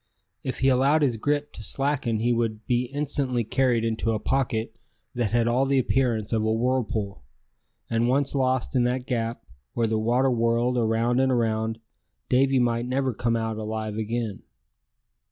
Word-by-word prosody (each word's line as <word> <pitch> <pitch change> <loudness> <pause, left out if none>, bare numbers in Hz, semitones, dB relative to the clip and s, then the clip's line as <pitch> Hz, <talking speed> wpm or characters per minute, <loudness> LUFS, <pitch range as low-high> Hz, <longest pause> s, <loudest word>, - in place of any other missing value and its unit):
If 130 - -4
he 135 - +3
allowed 135 +4 +4
his 125 -5 +1
grip 145 +4 -1
to - - -9
slacken 135 -2 -1
he 120 +1 +2
would 115 -2 -2
be 125 0 +1
instantly 140 -2 -1
carried 120 0 +1
into 115 0 0
a 110 - -1
pocket 115 -4 -1 0.4
that 120 -5 -1
had 115 0 +2
all 125 +3 +2
the 135 0 +2
appearance 120 -4 +1
of 110 - +2
a 110 - +1
whirlpool; 110 - -1 0.6
and 115 +1 +1
once 140 +2 +1
lost 130 -1 0
in 125 - +3
that 125 +1 -1
gap, 115 -2 -3 0.3
where 115 - +1
the 110 0 0
water 125 +4 +2
whirled 120 +1 +1
around 115 +2 +1
and 130 0 +3
around, 110 -2 0 0.5
Davy 135 +1 +3
might 120 -1 +1
never 130 0 0
come 115 +1 0
out 110 -1 -2
alive 110 0 -4
again. 110 -1 -3
120 Hz, 170 wpm, -25 LUFS, 115-130 Hz, 0.6 s, allowed